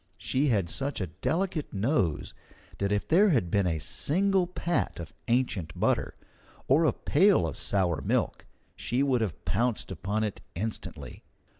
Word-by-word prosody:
She 130 Hz, +8 st, +1 dB
had 100 Hz, -9 st, +2 dB
such 140 Hz, -, -1 dB
a 95 Hz, -, -1 dB
delicate 160 Hz, -, -2 dB
nose 100 Hz, -, 0 dB, 0.5 s
that 100 Hz, 0 st, 0 dB
if 105 Hz, 0 st, 0 dB
there 195 Hz, +6 st, +5 dB
had 115 Hz, -, +1 dB
been 100 Hz, -2 st, +2 dB
a 80 Hz, -2 st, 0 dB
single 185 Hz, -, +1 dB
pat 175 Hz, -, -1 dB
of 85 Hz, -4 st, -8 dB
ancient 115 Hz, -10 st, 0 dB
butter -, -, +1 dB, 0.5 s
or 150 Hz, +5 st, +4 dB
a 150 Hz, -, +4 dB
pail 180 Hz, -, +3 dB
of 80 Hz, -, -3 dB
sour 90 Hz, -5 st, 0 dB
milk -, -, -1 dB, 0.3 s
she 125 Hz, +4 st, 0 dB
would 130 Hz, -4 st, +2 dB
have 100 Hz, -8 st, -3 dB
pounced 120 Hz, -4 st, 0 dB
upon 100 Hz, +5 st, -2 dB
it 105 Hz, -2 st, -3 dB
instantly. 110 Hz, +5 st, -5 dB
115 Hz, 155 wpm, -28 LUFS, 95-150 Hz, 0.5 s, there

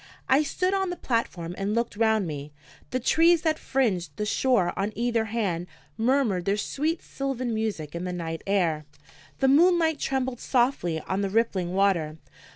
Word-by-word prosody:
I 265 Hz, +3 st, +5 dB
stood 365 Hz, +5 st, -1 dB
on 385 Hz, -1 st, 0 dB
the 355 Hz, -, -3 dB
platform 190 Hz, -, -2 dB
and 200 Hz, +2 st, -1 dB
looked 235 Hz, -2 st, -1 dB
round 220 Hz, -2 st, +2 dB
me. 150 Hz, -2 st, -6 dB, 0.4 s
The 255 Hz, -, -1 dB
trees 330 Hz, +6 st, +4 dB
that 315 Hz, -2 st, +1 dB
fringed 215 Hz, -10 st, -1 dB
the 210 Hz, -, -1 dB
shore 215 Hz, -5 st, +2 dB
on 200 Hz, +2 st, -1 dB
either 235 Hz, -1 st, 0 dB
hand 200 Hz, -6 st, -2 dB, 0.3 s
murmured 225 Hz, -6 st, +1 dB
their 200 Hz, +1 st, +1 dB
sweet 310 Hz, +9 st, -2 dB
sylvan 255 Hz, -3 st, -3 dB
music 215 Hz, -9 st, -3 dB
in 170 Hz, +1 st, -4 dB
the 180 Hz, -, -3 dB
night 165 Hz, -2 st, -4 dB
air; 170 Hz, -6 st, +1 dB, 0.6 s
the 270 Hz, -, +4 dB
moonlight 325 Hz, +1 st, +4 dB
trembled 260 Hz, -2 st, -1 dB
softly 240 Hz, -10 st, +1 dB
on 190 Hz, +5 st, -2 dB
the 200 Hz, -, -1 dB
rippling 190 Hz, -4 st, 0 dB
water. 175 Hz, -6 st, +1 dB
220 Hz, 165 wpm, -26 LUFS, 180-270 Hz, 0.6 s, I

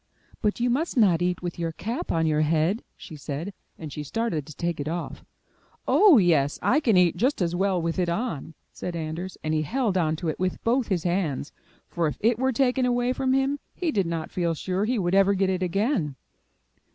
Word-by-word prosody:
''But 210 Hz, +1 st, +1 dB
you 240 Hz, 0 st, +2 dB
must 295 Hz, +3 st, -1 dB
not 185 Hz, -7 st, +4 dB
eat 180 Hz, 0 st, -1 dB
with 175 Hz, -1 st, -4 dB
your 165 Hz, -1 st, -1 dB
cap 225 Hz, +9 st, -4 dB
on 165 Hz, -1 st, +1 dB
your 155 Hz, -1 st, +2 dB
head, 160 Hz, +7 st, +1 dB
she 155 Hz, -, -10 dB
said, 150 Hz, +6 st, -5 dB, 0.2 s
and 155 Hz, -4 st, -8 dB
she 150 Hz, -, -5 dB
started 160 Hz, -, -2 dB
to 155 Hz, -, -10 dB
take 170 Hz, -2 st, -2 dB
it 145 Hz, -, -3 dB
off. 170 Hz, +2 st, -4 dB, 0.6 s
*'0h, 310 Hz, -, +6 dB
yes, 145 Hz, -4 st, +2 dB
I 285 Hz, -, +4 dB
can 230 Hz, -10 st, +3 dB
eat 180 Hz, -2 st, +4 dB
just 260 Hz, +5 st, +1 dB
as 175 Hz, -2 st, 0 dB
well 190 Hz, 0 st, +1 dB
with 165 Hz, +2 st, -2 dB
it 175 Hz, -1 st, +1 dB
on,*' 170 Hz, -, -3 dB, 0.2 s
said 175 Hz, -, -5 dB
Anders, 165 Hz, +3 st, -5 dB
and 155 Hz, 0 st, -1 dB
he 155 Hz, -, +1 dB
held 210 Hz, -, 0 dB
on 155 Hz, -2 st, +1 dB
to 165 Hz, +2 st, -5 dB
it 155 Hz, -, -2 dB
with 185 Hz, 0 st, -1 dB
both 240 Hz, +1 st, +1 dB
his 180 Hz, -4 st, -1 dB
hands, 170 Hz, -6 st, -1 dB, 0.4 s
for 170 Hz, -2 st, -1 dB
if 140 Hz, -4 st, -4 dB
it 230 Hz, +1 st, +2 dB
were 260 Hz, 0 st, +2 dB
taken 255 Hz, 0 st, +2 dB
away 245 Hz, 0 st, +1 dB
from 260 Hz, 0 st, 0 dB
him, 270 Hz, +2 st, +1 dB, 0.2 s
he 345 Hz, -3 st, -1 dB
did 195 Hz, -, 0 dB
not 165 Hz, -1 st, -3 dB
feel 170 Hz, -2 st, 0 dB
sure 185 Hz, +5 st, -1 dB
he 245 Hz, +2 st, 0 dB
would 180 Hz, -3 st, 0 dB
ever 195 Hz, +1 st, +4 dB
get 190 Hz, 0 st, +1 dB
it 185 Hz, -1 st, -2 dB
again. 185 Hz, -, 0 dB
180 Hz, 220 wpm, -25 LUFS, 165-230 Hz, 0.6 s, 0h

